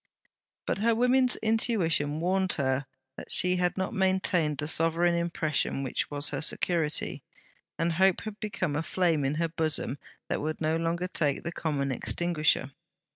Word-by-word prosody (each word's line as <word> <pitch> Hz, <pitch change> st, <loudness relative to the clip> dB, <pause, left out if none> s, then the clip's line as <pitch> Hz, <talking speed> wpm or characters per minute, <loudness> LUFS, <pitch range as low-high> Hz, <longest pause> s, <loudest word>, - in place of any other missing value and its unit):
But -, -, -1 dB
her 230 Hz, +2 st, +3 dB
woman's 250 Hz, +2 st, +4 dB
intuition 180 Hz, -10 st, +1 dB
warned 185 Hz, +2 st, +1 dB
her 135 Hz, -1 st, -1 dB, 0.3 s
that -, -, -8 dB
she 180 Hz, 0 st, +3 dB
had 180 Hz, +1 st, 0 dB
not 190 Hz, 0 st, -2 dB
maintained 185 Hz, -6 st, +1 dB
the 150 Hz, -, -3 dB
sovereign 165 Hz, +2 st, +3 dB
impression 165 Hz, -5 st, -1 dB
which 130 Hz, -, -2 dB
was 145 Hz, 0 st, -2 dB
her 140 Hz, -, -3 dB
security. 160 Hz, -1 st, 0 dB, 0.6 s
And 165 Hz, 0 st, 0 dB
hope 190 Hz, +2 st, +3 dB
had 215 Hz, -1 st, -7 dB
become 185 Hz, -7 st, -2 dB
a 150 Hz, -, 0 dB
flame 165 Hz, -3 st, +1 dB
in 135 Hz, +2 st, 0 dB
her 165 Hz, +2 st, 0 dB
bosom 155 Hz, -4 st, -2 dB, 0.3 s
that -, -, -2 dB
would 155 Hz, +1 st, -3 dB
no 155 Hz, 0 st, +1 dB
longer 165 Hz, +2 st, -1 dB
take 150 Hz, -6 st, -1 dB
the 170 Hz, -, -3 dB
common 145 Hz, -5 st, -2 dB
extinguisher. 150 Hz, 0 st, 0 dB
165 Hz, 160 wpm, -28 LUFS, 150-185 Hz, 0.6 s, woman's